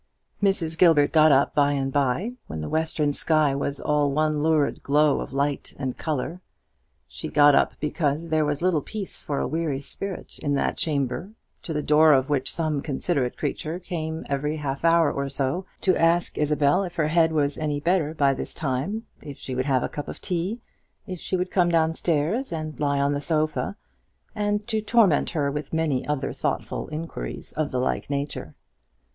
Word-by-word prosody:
Mrs. 170 -5 +1
Gilbert 160 -5 +5
got 155 -1 +6
up 140 0 +3
by 145 0 +3
and 135 -1 -2
by, 145 - +1 0.2
when 80 - -5
the 75 - -4
western 155 -2 0
sky 155 -2 +3
was 140 0 -2
all 150 -1 +1
one 155 +1 +1
lurid 155 -2 +1
glow 150 0 +3
of - - -7
light 140 +1 -2
and 130 -2 -3
colour. 160 +3 -3 0.7
She - - -6
got 145 -1 +5
up - - +3
because 150 +1 -1
there 155 -1 +2
was 145 +2 -2
little 180 -5 +2
peace 205 +5 -6
for 145 - -3
a - - 0
weary 160 -4 -1
spirit 190 +7 -6
in 145 -1 0
that - - 0
chamber; 145 - -2 0.3
to - - -6
the 150 -1 -1
door 155 +1 +6
of 135 +1 +2
which 135 -2 +1
some 155 -4 -1
considerate 140 -3 -1
creature 160 +2 -3
came 160 -3 -5
every 150 +2 -1
half 140 -1 -4
hour 165 -2 +4
or 140 0 -3
so 140 +7 -1 0.2
to 185 -2 +3
ask 170 +1 +2
Isabel 150 +4 +2
if 175 -2 -6
her 155 -3 +1
head 165 0 +3
was 145 -2 0
any 150 -2 -1
better 165 -1 +1
by 140 -2 +3
this 130 - -5
time, 155 - -2 0.2
if 145 -2 -9
she 130 - -6
would 130 +2 -1
have 130 -3 +2
a - - 0
cup 145 -2 -6
of - - -7
tea, 185 +5 -2 0.4
if 185 -4 -6
she 185 - -1
would 180 +1 -2
come 175 -2 +3
down 165 -1 +2
stairs 170 - 0
and 155 -2 -5
lie 140 -1 +1
on 140 +1 +2
the 145 - -2
sofa, 155 +4 -1 0.6
and 210 -1 -1
to 220 -1 0
torment 210 -8 +3
her 145 -4 -1
with 150 +2 -5
many 155 -5 0
other 145 -2 -1
thoughtful - - -3
inquiries 155 - -6
of 155 -1 -1
the 130 - -2
like 130 - -1
nature. 140 +1 -4
150 Hz, 190 wpm, -25 LUFS, 140-165 Hz, 0.7 s, got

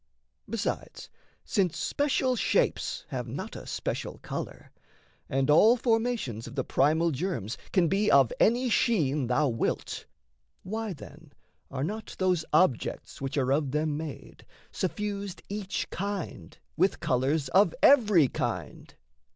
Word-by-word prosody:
Besides, - - -4 0.3
Since 190 -8 0
special 270 -3 +1
shapes - - 0
have - - -4
not - - -6
a - - -9
special - - -4
colour, - - -6 0.6
And 135 0 +1
all 215 +11 +6
formations 225 - 0
of - - -9
the 135 - 0
primal 160 +7 +2
germs 130 - -3 0.2
Can 180 -3 +3
be 200 +4 +2
of 135 -4 +5
any 245 +3 +3
sheen 150 - +2
thou 140 +5 +2
wilt, 115 -1 -2 0.6
why, 215 +1 -3
then, 150 0 -13 0.4
Are 135 0 -3
not 215 +7 -5
those 180 -3 +1
objects 150 - +1
which 135 +1 -3
are 135 -1 +2
of 145 -1 +1
them 150 +2 0
made 155 -1 -7 0.3
Suffused, 200 0 -3
each 200 -2 -3
kind 185 - -5 0.2
with - - +2
colours 135 +3 +1
of 185 +1 +4
every 210 - +6
kind? - - -4
165 Hz, 130 wpm, -28 LUFS, 140-210 Hz, 0.6 s, all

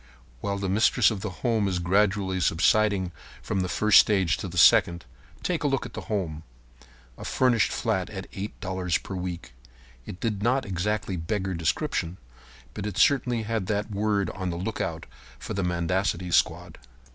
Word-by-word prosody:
While 100 +8 -2
the 100 -1 -3
mistress 105 +4 +3
of 100 -3 -4
the 105 - -3 0.2
home 110 -4 +2
is 95 -2 -1
gradually 95 +1 +1
subsiding 95 +2 +2 0.3
from 95 - -3
the 90 -1 -1
first 105 +2 +5
stage 95 -6 +3
to - - -5
the - - -8
second, 85 -3 +5 0.4
take 175 -3 -1
a - - +2
look 135 -2 0
at - - -9
the - - -5
home. 85 -8 -2 0.8
A - - -7
furnished 125 -4 +2
flat 95 -1 -1
at 95 -2 -7
$8 95 -3 -3
per - - -7
week. 90 -9 -5 0.5
It 90 - -8
did 105 -4 -2
not 130 +4 +1
exactly 95 0 -2
beggar 95 +3 -2
description, 85 +1 -1 0.6
but 100 - -4
it 105 - -5
certainly 125 -4 +3
had 110 -3 -2
that 105 +1 -2
word 105 -1 0
on 95 -1 -4
the 85 - -3
lookout 100 +5 -3 0.3
for - - -6
the 100 - -1
mendicancy 90 +1 -1
squad. - - +1
95 Hz, 170 wpm, -26 LUFS, 90-105 Hz, 0.8 s, first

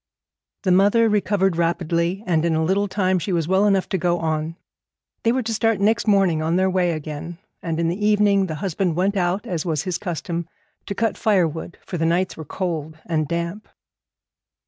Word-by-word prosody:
The 185 - +2
mother 205 +5 +4
recovered 200 -4 +1
rapidly, 170 +2 0
and 165 -3 +1
in 170 -1 +1
a 160 - +1
little 195 +5 +1
time 185 -2 +1
she 190 - -3
was 165 -3 0
well 190 +3 +3
enough 195 -2 +2
to 190 - -1
go 175 +1 +1
on. 160 0 -2 0.7
They 230 - +2
were 255 +1 0
to 225 0 -2
start 225 -2 +1
next 220 +3 +2
morning 195 -6 +3
on 160 +2 0
their 190 +1 +2
way 180 -2 +1
again; 155 +2 -6 0.2
and 165 -1 -3
in 170 - +1
the 180 +5 -2
evening 205 -2 +3
the 160 - -4
husband 180 -2 0
went 190 +4 +1
out, 185 +1 0
as 170 -4 -2
was 155 -4 -1
his 180 -2 -2
custom, 170 -1 -4 0.4
to 200 - -3
cut 225 -1 -1
firewood, 170 -6 0
for 175 - -4
the 165 - +1
nights 180 +3 +1
were 160 - -8
cold 160 -2 -4
and 155 -3 -1
damp. 170 +6 -3
180 Hz, 195 wpm, -22 LUFS, 165-200 Hz, 0.7 s, mother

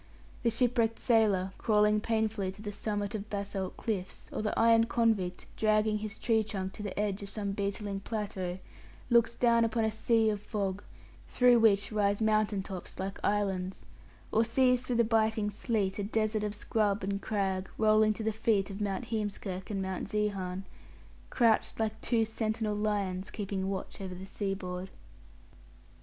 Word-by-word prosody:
The 235 - +2
shipwrecked 230 -1 +2
sailor, 205 -5 +2
crawling 210 -1 +3
painfully 220 -4 0
to 200 - -12
the 205 - -4
summit 205 0 -3
of 215 0 -5
basalt 200 -2 -4
cliffs, 195 -5 -4
or - - -2
the 215 - -2
ironed 230 0 +5
convict, 215 -7 +1
dragging 215 0 +2
his 215 -1 -5
tree 220 -2 +2
trunk 195 -3 -4
to - - -8
the 205 -1 -4
edge 205 -1 -1
of 200 - -5
some 200 -2 -2
beetling 200 0 -2
plateau, 195 -4 -3 0.5
looks 235 0 +4
down 235 -1 +4
upon 225 0 +1
a 220 - +1
sea 225 0 +2
of 205 -1 -4
fog, 200 -2 -2 0.5
through 245 -1 +5
which 205 -2 +4
rise 205 -1 +1
mountain 215 -2 +2
tops 190 -2 -8
like 195 +1 -4
islands; 195 -2 -1 0.5
or 225 - +4
sees 250 +2 +3
through 250 -1 -2
the 235 - +4
biting 220 -2 +1
sleet 205 -3 -1
a - - 0
desert 215 +1 0
of 210 0 -2
scrub 210 -1 0
and 200 +1 -2
crag 190 -3 -1
rolling 215 0 +4
to 220 - -5
the 220 0 0
feet 205 -2 +1
of 195 +2 -6
Mount 200 +3 -2
Heemskirk 205 -4 -3
and 195 -2 -2
Mount 190 0 -4
Zeehan 195 -3 -1 0.7
crouched 230 -3 +2
like 220 0 -1
two 230 -2 +2
sentinel 220 -1 -1
lions 200 -3 -1
keeping 195 -2 -3
watch 195 0 -5
over 185 -2 -5
the 185 +1 -8
seaboard. 190 -2 -4
210 Hz, 165 wpm, -31 LUFS, 195-220 Hz, 0.7 s, ironed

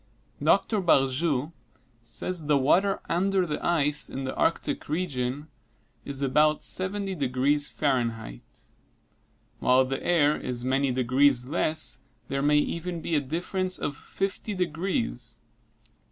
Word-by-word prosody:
Dr. 215 -3 +2
Barjou 145 -2 +2 0.5
says 155 +7 -3
the 150 -1 +4
water 190 +9 +2
under 190 +1 +1
the 150 -3 -4
ice 150 -3 +1
in 135 - -5
the 130 - -3
Arctic 165 - -1
region 145 -4 -2 0.6
is 140 0 0
about 150 +3 +3
70 195 +1 +1
degrees 140 0 +1
Fahrenheit. 115 - -3 0.9
While 130 +1 +4
the 135 +1 -4
air 150 -4 +3
is 125 -1 -4
many 135 +1 +1
degrees 130 +1 +3
less, 155 -2 0 0.3
there 135 0 -1
may 150 +1 +3
even 170 +3 -2
be 165 - -4
a 150 - +3
difference 180 +6 -2
of 145 - -3
50 195 +6 -4
degrees. 170 - -2
145 Hz, 125 wpm, -27 LUFS, 130-175 Hz, 0.9 s, the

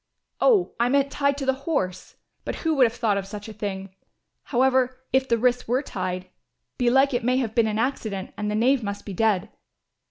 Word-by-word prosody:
"Oh, 425 -8 +3
I 240 +1 +3
meant 280 +1 +2
tied 280 -1 +1
to 275 - -3
the 265 - +3 0.2
horse, 185 - -2 0.3
but - - -4
who 325 -1 0
would 270 -4 +5
have 230 - -7
thought 215 -5 +1
of 195 - -7
such 205 +1 -8
a 220 - -8
thing! 195 -2 -5 0.5
However, 255 0 +2
if 265 0 +2
the 235 - +3
wrists 245 +1 +1
were 255 +5 +1
tied, 185 -5 -4 0.5
belike 265 +3 +4
it 245 0 0
may 250 +2 +2
have 235 -5 -1
been 230 -1 +3
an 215 0 -1
accident 220 -5 -2
and 210 0 -3
the 210 - -1
knave 250 +4 +3
must 200 -1 -5
be 200 - -6
dead. 205 -1 +1
235 Hz, 210 wpm, -24 LUFS, 205-265 Hz, 0.5 s, would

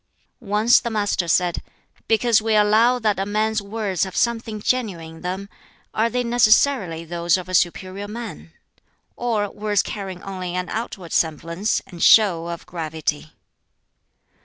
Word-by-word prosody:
Once 215 +3 +5
the 235 - -4
Master 205 -5 -1
said, 175 +1 +1 0.5
"Because 225 0 +3
we 220 0 +1
allow 215 +4 +4
that 215 -4 0
a 195 - 0
man's 215 +1 0
words 200 -3 -2
have 190 -2 -5
something 225 -2 -1
genuine 190 -9 -2
in - - -15
them, 185 +2 -4 0.5
are 225 +2 +1
they 250 +1 -1
necessarily 225 -7 +3
those 170 +2 +1
of 185 0 -7
a 185 - -7
superior 185 +3 0
man? 220 -6 -8 0.6
or 225 -4 -1
words 205 -1 0
carrying 190 -4 -6
only 185 -2 -5
an 180 0 -3
outward 200 -6 -5
semblance 170 +6 0
and 175 -3 -11
show 180 -7 +5
of 170 -1 -6
gravity?" 160 -2 -4
200 Hz, 145 wpm, -22 LUFS, 175-220 Hz, 0.6 s, Once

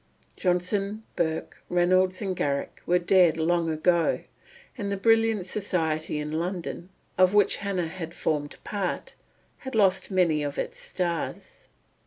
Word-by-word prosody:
Johnson, 195 +4 0
Burke, 160 -2 -2
Reynolds, 185 +2 +2
and 190 -2 -2
Garrick 140 -4 -2
were 180 - +4
dead 175 -2 +4
long 165 +1 +1
ago, 165 +2 +2 0.5
and 200 -4 -3
the 200 - -1
brilliant 225 -1 +3
society 160 -6 -1
in 150 0 -3
London, 175 0 -4 0.3
of 185 +2 +5
which 205 - +4
Hannah 195 -4 -2
had 165 0 -7
formed 145 -2 -2
part, 200 -3 -3 0.5
had 265 -3 -7
lost 195 -3 +3
many 175 -6 +2
of 145 -1 -3
its - - -3
stars. 170 -3 -4
180 Hz, 135 wpm, -26 LUFS, 165-195 Hz, 0.5 s, of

